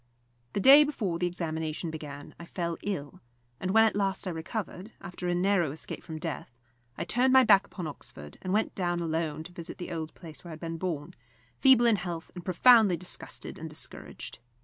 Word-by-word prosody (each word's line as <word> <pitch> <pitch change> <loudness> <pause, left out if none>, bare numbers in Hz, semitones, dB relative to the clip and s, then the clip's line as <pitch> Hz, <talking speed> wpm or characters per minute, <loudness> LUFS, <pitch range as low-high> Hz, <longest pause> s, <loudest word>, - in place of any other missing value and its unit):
The - - 0
day 275 +8 +9
before 210 - -2
the 180 - +1
examination 160 -2 -3
began 145 -2 -8
I 170 - -8
fell 170 -1 -3
ill; 150 -8 -4 0.4
and 185 - -3
when 225 +3 +6
at 220 - +1
last 195 -1 0
I - - -1
recovered, 185 +4 -5
after 180 0 -6
a 175 - +1
narrow 180 -4 +2
escape 155 - -6
from 160 -2 -7
death, 155 -3 -5 0.5
I 170 - -2
turned 245 +8 +2
my 260 0 +8
back 200 -4 +5
upon 180 - -6
Oxford, 75 - -9
and 185 - -3
went 215 +3 +1
down 175 -2 -1
alone 160 -2 -2
to 175 - -10
visit 170 0 -8
the 175 - -6
old 160 -2 -5
place 160 -3 -11
where 175 - -9
I - - -6
had 155 - -9
been 165 0 -4
born, 160 -5 -3 0.5
feeble 260 -3 +6
in 230 -3 +5
health 175 -2 -5
and 180 - -8
profoundly 200 +1 +6
disgusted 180 +2 -5
and - - -6
discouraged. - - -6
175 Hz, 200 wpm, -29 LUFS, 160-200 Hz, 0.5 s, day